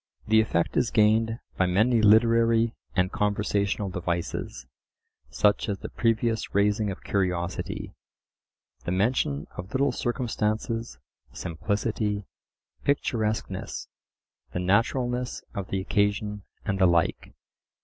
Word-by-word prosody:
The 110 +1 +6
effect 85 -6 0
is 120 - +2
gained 110 +1 +3 0.2
by 95 - +3
many 110 +6 +3
literary 115 +1 +5 0.2
and 95 0 +2
conversational 100 -1 0
devices, 85 -8 -3 0.6
such 105 +1 +2
as 100 - -1
the - - -7
previous 115 -2 0
raising 105 +1 +2
of 95 - -6
curiosity, 90 -3 -2 0.9
the 85 - -3
mention 95 - +1
of 90 +3 -7
little 140 +1 +2
circumstances, 115 -2 -2 0.4
simplicity, 105 +3 -2 0.6
picturesqueness, 110 -6 -1 0.6
the - - -1
naturalness 120 +6 0
of 100 -2 -4
the 95 - -1
occasion, 105 +1 0 0.2
and 95 -2 -1
the 95 - +6
like. 85 -1 +1
105 Hz, 110 wpm, -27 LUFS, 95-115 Hz, 0.9 s, The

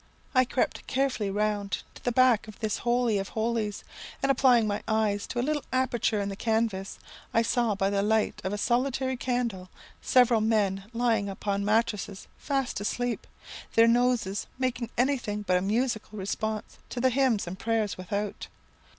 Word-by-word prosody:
I 255 0 +5
crept 245 - -1
carefully 260 -6 0
round 205 0 -1
to - - -15
the 245 - +1
back 245 -3 +4
of 215 - -10
this 215 -3 -1
holy 240 -3 +1
of 195 - -4
holies, 220 -2 -2 0.4
and 275 - +4
applying 250 -4 +4
my 205 -1 -1
eyes 215 -2 +1
to 240 - -3
a 240 - +1
little 300 0 0
aperture 250 -4 +1
in 200 - -1
the 195 - -4
canvas, 220 -3 -1 0.4
I 230 - +5
saw 230 -2 +1
by 195 0 0
the 200 0 +1
light 215 +1 +1
of 190 - -2
a 205 - -2
solitary 260 +3 0
candle 240 -7 -2 0.3
several 245 -3 +4
men 205 -3 +1
lying 230 -4 +1
upon 200 +1 -2
mattrasses 210 -2 0
fast 270 -7 -1
asleep, 245 +3 -2 0.5
their 230 0 +7
noses 235 -4 +2
making 250 -3 -1
anything 245 -5 0
but 185 -2 +2
a - - 0
musical 220 +1 -1
response 215 +2 -3
to 245 - -4
the 260 +1 +3
hymns 255 -5 +2
and 180 +2 -7
prayers 220 -2 0
without. 200 +2 -4
220 Hz, 170 wpm, -28 LUFS, 205-245 Hz, 0.5 s, their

